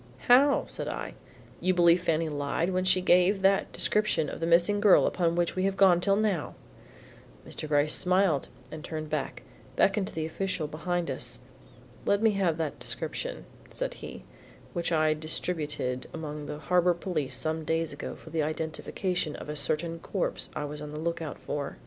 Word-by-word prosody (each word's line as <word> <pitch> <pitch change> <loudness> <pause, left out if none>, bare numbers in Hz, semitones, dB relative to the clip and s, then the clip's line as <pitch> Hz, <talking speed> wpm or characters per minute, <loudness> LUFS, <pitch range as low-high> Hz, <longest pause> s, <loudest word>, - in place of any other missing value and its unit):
"How!" 275 +4 +6
said - - -5
I. - - -4 0.5
"You 185 0 +1
believed 170 0 +5
Fanny 165 -1 +1
lied 145 +4 -1
when 185 0 0
she 185 0 +4
gave 180 +2 +4
that 195 0 +3
description 210 -8 +1
of - - -6
the 165 - -1
missing 175 +5 +4
girl 205 -2 +6
upon 170 -2 +1
which 175 -1 0
we 185 0 0
have 195 0 0
gone 180 -3 +6
till 195 +1 +3
now?" 200 -7 0 0.9
Mr. 155 - -6
Gryce 150 0 +3
smiled, 180 -5 +2 0.2
and 155 -1 -7
turning 155 -2 -5
back, 150 -3 -3 0.3
beckoned 195 0 +2
to - - -9
the 160 -1 -1
official 170 0 -2
behind 170 +3 -2
us. - - -3 0.7
"Let 200 - +2
me 220 - +5
have 190 -5 +1
that 160 -3 -3
description," - - -4 0.2
said - - -3
he, 65 - -9 0.5
"which 170 0 -2
I 155 -1 +3
distributed 150 -4 -3
among 150 -2 -6
the 150 - -5
Harbor 175 +3 +2
Police 155 -7 -2
some 160 0 -2
days 160 -1 -1
ago 145 - -6
for 160 - -13
the 160 -1 0
identification 155 +2 -2
of - - -8
a 150 - -3
certain 160 +3 -2
corpse 190 +3 -2
I 150 - -2
was 150 +1 -7
on 150 - -6
the 150 - -5
lookout 165 -2 -3
for." 145 -1 -4
165 Hz, 180 wpm, -28 LUFS, 155-185 Hz, 0.9 s, How